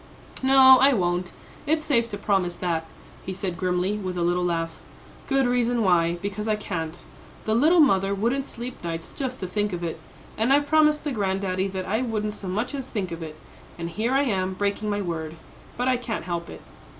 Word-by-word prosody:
"No, 265 -1 +8
I 275 +2 +6
won't; 175 -2 0 0.4
it's 310 +1 +1
safe 235 -5 +2
to 205 - -5
promise 195 -4 0
that," 165 -3 -2 0.4
he 190 - -5
said 185 -1 -3
grimly, 180 +3 0
with 185 -2 -4
a 175 - 0
little 175 +1 +1
laugh. 165 -2 -2 0.5
"Good 270 -1 +2
reason 245 -1 +1
why; 175 -2 +3
because 205 +2 -3
I 215 - +2
can't. 175 -5 -5 0.4
The 220 - +1
little 310 +10 +4
mother 195 -7 +3
wouldn't 245 +7 0
sleep 240 -2 -7
nights 165 -1 -5
just 260 -2 -4
to 185 - -3
think 205 +1 -1
of 175 0 -4
it, 165 - -4 0.4
and 225 +4 +2
I 280 - +6
promised 300 0 +3
the 295 - -2
granddaddy 190 -3 -1
that 190 -1 -4
I 220 +5 0
wouldn't 215 -4 -2
so 200 - -8
much 215 +8 -2
as 270 -2 -4
think 195 -8 -3
of 165 0 -6
it, 155 -1 -7 0.4
and 170 0 -5
here 220 +9 -1
I 275 +1 +3
am 190 -7 0
breaking 205 +2 -1
my 205 0 -1
word; 160 -2 -4 0.4
but 245 +1 0
I 255 -1 +3
can't 235 -7 -4
help 170 -1 -4
it." - - -10
200 Hz, 205 wpm, -25 LUFS, 180-245 Hz, 0.5 s, No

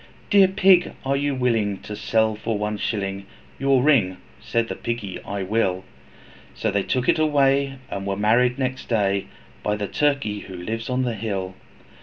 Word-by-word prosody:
'Dear 200 -2 +7
Pig, 185 -1 +4
are 135 +1 +1
you 140 0 0
willing, 115 -6 +1
to 105 - -7
sell 110 +1 +1
for 110 0 -2
one 105 +1 -2
shilling 100 -2 -3 0.3
Your 135 -1 +3
ring?' 110 -12 +3 0.2
Said 115 0 -1
the - - -3
Piggy, 115 -5 -4
'I 100 -1 -4
will.' 95 -2 0 0.7
So 110 - -1
they 100 0 +1
took 125 +5 -1
it - - +3
away, 140 -2 +2 0.2
and 100 0 -4
were 100 -1 -1
married 120 +5 +3
next 130 -1 -3
day, 100 -4 +1 0.3
By 105 - 0
the 105 -1 -3
Turkey 140 -8 0
who 95 -2 -9
lives 110 +7 -4
on 130 0 0
the 120 -2 -1
hill. 100 -4 -3
115 Hz, 175 wpm, -23 LUFS, 100-135 Hz, 0.7 s, Dear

